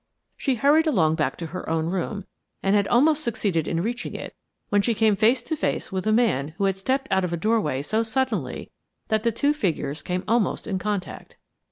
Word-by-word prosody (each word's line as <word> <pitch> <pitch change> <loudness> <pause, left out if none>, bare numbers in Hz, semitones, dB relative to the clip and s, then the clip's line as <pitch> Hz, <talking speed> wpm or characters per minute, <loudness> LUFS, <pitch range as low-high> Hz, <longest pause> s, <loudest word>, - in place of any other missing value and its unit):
She 270 - 0
hurried 295 +7 +4
along 170 - +3
back 155 -1 -1
to 170 - -5
her 185 +3 -6
own 160 -1 0
room, 190 +3 -3 0.4
and 195 +1 +3
had 200 -1 +2
almost 300 +5 +3
succeeded 200 - -1
in 165 0 -1
reaching 240 +3 -3
it, - - -7 0.3
when 205 -1 +3
she 230 +2 0
came 215 -1 +3
face 230 +5 +3
to 315 - -2
face 310 - -2
with 190 +2 -2
a - - +3
man 160 - +1
who 200 - -1
had 195 -1 +2
stepped 265 +7 -1
out 190 0 +3
of 175 -1 -2
a - - 0
doorway 170 -9 0
so 215 +9 0
suddenly 260 +4 -2 0.4
that 220 -1 +2
the 230 +1 +1
two 285 +6 +1
figures 160 - -2
came 180 +1 -3
almost 230 -1 +1
in 195 -4 -2
contact. 205 -1 -4
210 Hz, 210 wpm, -24 LUFS, 180-240 Hz, 0.4 s, hurried